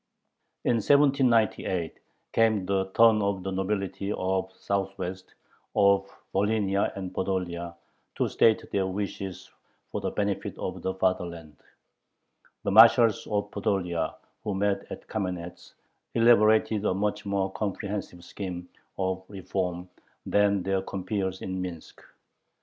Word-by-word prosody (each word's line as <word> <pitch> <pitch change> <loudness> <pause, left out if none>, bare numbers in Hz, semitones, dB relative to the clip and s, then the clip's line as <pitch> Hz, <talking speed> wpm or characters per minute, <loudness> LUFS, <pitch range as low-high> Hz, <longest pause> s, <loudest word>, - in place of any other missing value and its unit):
In 120 - +2
1798 115 - +2 0.3
came 110 -4 +3
the 95 0 +1
turn 115 -2 +6
of 100 -2 -1
the 95 - -3
nobility 95 +1 -2
of 95 -1 -1
the 95 - -28
Southwest, 95 -2 -3 0.4
of 100 0 +4 0.2
Volhynia 100 -1 +1
and 95 -2 -5
Podolia, 85 -3 -2 0.4
to - - +1
state 110 -1 +3
their 95 -1 +1
wishes 95 -1 -5 0.4
for - - -3
the - - -1
benefit 100 -1 -2
of - - -4
the 95 0 -2
fatherland. 85 -4 -2 1.1
The - - 0
marshals 115 +1 +7
of 105 -1 -1
Podolia, 90 -6 -1 0.3
who 105 - -2
met 100 0 0
at - - -8
Kamenetz, 90 -4 -5 0.4
elaborated 110 -2 +4
a 95 - +1
much 105 +2 -1
more 100 -1 0
comprehensive 100 -3 -4
scheme 90 -1 -6 0.3
of 95 0 -1
reform 90 -2 -3 0.4
than 100 -2 +2
their 95 0 0
compeers 95 0 -3
in 95 0 -3
Minsk. 90 -3 -7
95 Hz, 120 wpm, -27 LUFS, 95-105 Hz, 1.1 s, marshals